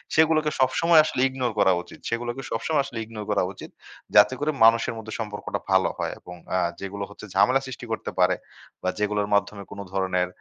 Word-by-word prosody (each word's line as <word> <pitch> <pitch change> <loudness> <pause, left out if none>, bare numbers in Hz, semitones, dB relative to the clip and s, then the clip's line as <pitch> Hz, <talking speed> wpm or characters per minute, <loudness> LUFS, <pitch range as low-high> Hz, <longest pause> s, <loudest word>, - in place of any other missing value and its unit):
সেগুলোকে 155 -1 +4
সবসময় 165 +5 +4
আসলে 130 - -1
ইগনোর 130 -3 -2
করা 95 - +5
উচিত। - - -14
সেগুলোকে 120 +3 -3
সবসময় 140 +5 0
আসলে 120 -4 -6
ইগনোর 110 -2 -8
করা 100 - +2
উচিত। - - -10 0.5
যাতে - - +7
করে 150 +1 +1
মানুষের 115 0 +4
মধ্যে 110 0 -7
সম্পর্কটা 105 -2 -4
ভালো 95 0 +4
হয় - - -2
এবং 90 - -11 0.2
আ - - +3 0.2
যেগুলো 100 +1 -5
হচ্ছে 100 - -11
ঝামেলা 125 +8 +4
সৃষ্টি 125 -1 -7
করতে 110 - -3
পারে 90 0 +4 0.5
বা 95 - +1
যেগুলোর 105 0 0
মাধ্যমে 100 0 -1
কোন 100 - -8
ধরনের 95 -2 +1
110 Hz, 185 wpm, -25 LUFS, 100-130 Hz, 0.5 s, যাতে